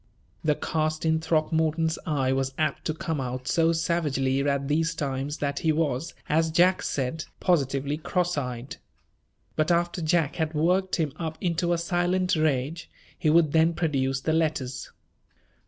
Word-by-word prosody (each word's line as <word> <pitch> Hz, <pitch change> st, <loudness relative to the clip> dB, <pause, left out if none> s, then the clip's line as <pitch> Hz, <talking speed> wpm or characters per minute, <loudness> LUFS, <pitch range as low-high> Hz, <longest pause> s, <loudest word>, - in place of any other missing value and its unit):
The 150 Hz, -1 st, +2 dB
cast 155 Hz, +1 st, -1 dB
in 160 Hz, 0 st, +3 dB
Throckmorton's 160 Hz, 0 st, +1 dB
eye 135 Hz, -4 st, +1 dB
was 135 Hz, 0 st, -1 dB
apt 155 Hz, -, -1 dB
to 155 Hz, -, 0 dB
come 160 Hz, -5 st, -2 dB
out 125 Hz, 0 st, -4 dB
so 165 Hz, -1 st, +3 dB
savagely 150 Hz, -5 st, 0 dB
at 140 Hz, -1 st, 0 dB
these 160 Hz, +3 st, +1 dB
times 140 Hz, -1 st, -3 dB
that 140 Hz, -1 st, -2 dB
he 160 Hz, -, +2 dB
was, 150 Hz, -1 st, -1 dB
as 160 Hz, +2 st, +2 dB
Jack 180 Hz, +3 st, +4 dB
said, 140 Hz, +4 st, -2 dB
positively 140 Hz, -4 st, +1 dB
cross 180 Hz, +2 st, -1 dB
eyed. 125 Hz, -2 st, -4 dB, 0.8 s
But 155 Hz, +1 st, +1 dB
after 175 Hz, +1 st, +1 dB
Jack 160 Hz, -2 st, +1 dB
had 160 Hz, -1 st, -1 dB
worked 180 Hz, +5 st, +2 dB
him 155 Hz, -5 st, -1 dB
up 160 Hz, -2 st, -4 dB
into 175 Hz, 0 st, 0 dB
a 175 Hz, -, +2 dB
silent 175 Hz, +2 st, +1 dB
rage, 155 Hz, +1 st, -1 dB, 0.3 s
he 160 Hz, -, 0 dB
would 160 Hz, -1 st, +4 dB
then 160 Hz, +1 st, +3 dB
produce 135 Hz, -5 st, 0 dB
the 160 Hz, -, 0 dB
letters. 145 Hz, -6 st, -1 dB
155 Hz, 155 wpm, -26 LUFS, 140-165 Hz, 0.8 s, Jack